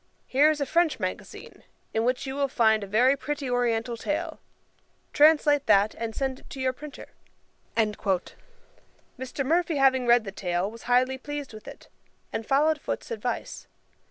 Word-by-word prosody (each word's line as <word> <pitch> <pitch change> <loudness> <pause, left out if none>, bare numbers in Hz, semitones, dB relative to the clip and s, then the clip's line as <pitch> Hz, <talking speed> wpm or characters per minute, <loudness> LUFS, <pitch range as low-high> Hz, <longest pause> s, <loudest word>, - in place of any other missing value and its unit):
Here 285 +4 +4
is 310 -1 0
a 280 - 0
French 330 +3 +1
magazine, - - -6 0.3
in 225 - +1
which 250 +3 0
you 265 - -4
will 280 0 0
find 220 -5 +2
a - - -6
very 245 +7 +4
pretty 290 0 -4
oriental 240 -1 0
tale; 310 +6 -3 0.7
translate 295 -1 +4
that, 200 +2 +4
and 230 -1 -5
send 265 -1 -2
it - - -19
to 270 - -8
your 260 0 0
printer.' 300 0 -10 0.7
Mr. 210 -4 -1 1.1
Murphy 335 +2 +1
having 260 -2 +3
read 240 -1 +5
the 195 - -6
tale, 180 +1 -2
was 230 +1 -12
highly 255 +2 +2
pleased 290 -2 -6
with 215 - -12
it, - - -11 0.5
and 225 - -4
followed 300 +2 +2
Foote's - - -5
advice. 465 - -4
260 Hz, 160 wpm, -26 LUFS, 225-290 Hz, 1.1 s, read